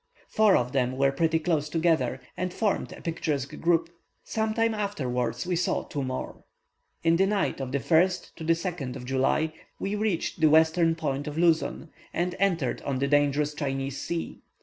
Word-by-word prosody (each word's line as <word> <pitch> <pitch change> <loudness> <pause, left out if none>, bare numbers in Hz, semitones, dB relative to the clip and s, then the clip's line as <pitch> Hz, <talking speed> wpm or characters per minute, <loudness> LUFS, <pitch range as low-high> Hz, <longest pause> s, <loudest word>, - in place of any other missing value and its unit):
Four 215 -2 +4
of 125 0 -1
them 130 -1 0
were 135 0 +3
pretty 160 +3 +1
close 155 -2 0
together, 155 -6 +1
and 180 0 -2
formed 210 +1 -1
a - - -10
picturesque 150 -5 -2
group. 165 -1 +2 0.4
Some 220 -1 -1
time 225 0 +2
afterwards 130 - -2
we 180 0 0
saw 175 - 0
two 145 - -4
more. 130 -1 -5 0.6
In 165 0 +4
the 195 +2 +3
night 200 -8 0
of 130 -1 -4
the 140 - +1
1st 175 +6 +2
2nd 165 -4 -2
of 125 -2 -7
July, 135 +4 +1 0.3
we 195 - -2
reached 210 -5 -1
the 155 - +6
western 160 +1 +4
point 145 -3 -2
of 150 +1 -5
Luzon, 165 -1 +1 0.2
and 175 +1 0
entered 170 -9 +1
on 135 -2 -2
the 140 +2 0
dangerous 145 +1 +2
Chinese 135 -2 -3
Sea. 170 -1 -4
160 Hz, 170 wpm, -27 LUFS, 140-175 Hz, 0.6 s, the